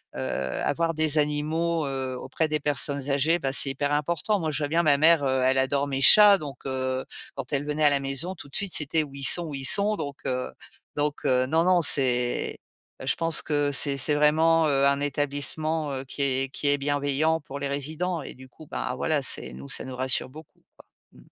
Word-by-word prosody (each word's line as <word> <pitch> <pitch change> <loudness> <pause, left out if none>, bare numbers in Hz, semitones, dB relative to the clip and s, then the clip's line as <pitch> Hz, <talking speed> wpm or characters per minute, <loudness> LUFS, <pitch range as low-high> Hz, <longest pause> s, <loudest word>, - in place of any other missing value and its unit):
heu - - -6 0.4
avoir 165 - -1
des 155 -1 0
animaux, 155 +2 -1
heu, 130 -1 -4
auprès 160 +5 -3
des 155 -1 -3
personnes 140 -1 -1
âgées, 145 +5 +1
bah 135 -2 -3
c'est 135 0 +3
hyper 145 +2 -3
important. 170 +7 -1
Moi, 160 -2 -3
je 145 - -3
vois 145 - -2
bien 170 +2 +1
ma 145 -2 +4
mère, 160 0 +4
heu, 130 -1 0
elle 130 +1 +1
adore 140 +2 0
mes 135 -1 -3
chats, 205 +7 +9
donc 145 -5 -8
heu, 130 0 -3 0.3
quand - - -8
elle 145 0 -2
venait 150 +1 -2
à 145 - +6
la 140 -1 +1
maison 135 +7 -3
tout 145 - -12
de - - -9
suite: 200 -3 -1
«C'était 155 +1 0
où 140 -2 -12
ils 140 - -6
sont, 170 +4 +6
où 145 - -7
ils 135 0 -4
sont?» 205 +7 +4
donc 140 -1 -7
heu 125 0 -3 0.4
donc 145 0 -3
heu, 130 0 +1
non 160 +3 +1
non, 180 -1 +3
c'est 125 -5 +1 0.5
je - - +1
pense 165 -1 +2
que 145 -1 -1
c'est 140 0 +2
c'est 145 +3 +1
vraiment, 160 +2 +2
heu, 140 -1 +1
un 140 0 +1
établissement, 145 +2 -2
heu, 130 0 -5
qui 140 +2 -5
est 135 0 -1
qui 145 - -4
est 145 0 +1
bienveillant 145 +3 -1
pour 140 -1 -9
les 140 - -3
résidents 155 +4 -4
et - - -9
du 130 0 -16
coup, 155 - -16
bah - - -5
voilà, 155 -3 -1
c'est, 65 - -1
nous 70 +2 -11
ça - - +2
nous 130 -1 -8
rassure 130 0 0
beaucoup, 155 +4 -16
quoi. - - -19 0.3
Mmh. - - -18
145 Hz, 225 wpm, -25 LUFS, 135-160 Hz, 0.5 s, chats